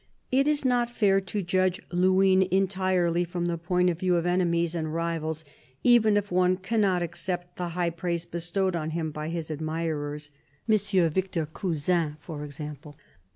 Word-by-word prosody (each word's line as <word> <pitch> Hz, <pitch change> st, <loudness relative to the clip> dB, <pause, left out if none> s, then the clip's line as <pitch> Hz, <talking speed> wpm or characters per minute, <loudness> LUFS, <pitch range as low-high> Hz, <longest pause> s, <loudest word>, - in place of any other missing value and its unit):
It 270 Hz, +2 st, +3 dB
is 295 Hz, -2 st, +1 dB
not 245 Hz, -2 st, +2 dB
fair 200 Hz, -5 st, +2 dB
to 195 Hz, +2 st, -3 dB
judge 185 Hz, +1 st, +1 dB
Luynes 185 Hz, +1 st, +4 dB
entirely 185 Hz, -2 st, +1 dB
from 175 Hz, 0 st, -3 dB
the 170 Hz, -1 st, 0 dB
point 180 Hz, +2 st, +1 dB
of 165 Hz, -, -6 dB
view 180 Hz, -1 st, +2 dB
of 170 Hz, 0 st, 0 dB
enemies 170 Hz, -2 st, +1 dB
and 160 Hz, -2 st, -2 dB
rivals, 160 Hz, -1 st, -2 dB, 0.4 s
even 220 Hz, -4 st, +5 dB
if 205 Hz, -1 st, -2 dB
one 180 Hz, 0 st, +3 dB
cannot 190 Hz, -2 st, +1 dB
accept 175 Hz, +1 st, -5 dB
the 175 Hz, -1 st, -3 dB
high 175 Hz, -1 st, +1 dB
praise 170 Hz, 0 st, -3 dB
bestowed 175 Hz, +2 st, -1 dB
on 155 Hz, -2 st, -2 dB
him 160 Hz, -2 st, -2 dB
by 150 Hz, +1 st, -5 dB
his 165 Hz, -2 st, -4 dB
admirers 150 Hz, -1 st, -3 dB, 0.2 s
— 140 Hz, -, -38 dB
M. 200 Hz, -5 st, +3 dB
Victor 185 Hz, -2 st, -1 dB
Cousin 160 Hz, -1 st, -1 dB
for 150 Hz, -4 st, -7 dB
example. 150 Hz, 0 st, -8 dB
175 Hz, 165 wpm, -27 LUFS, 160-190 Hz, 0.4 s, even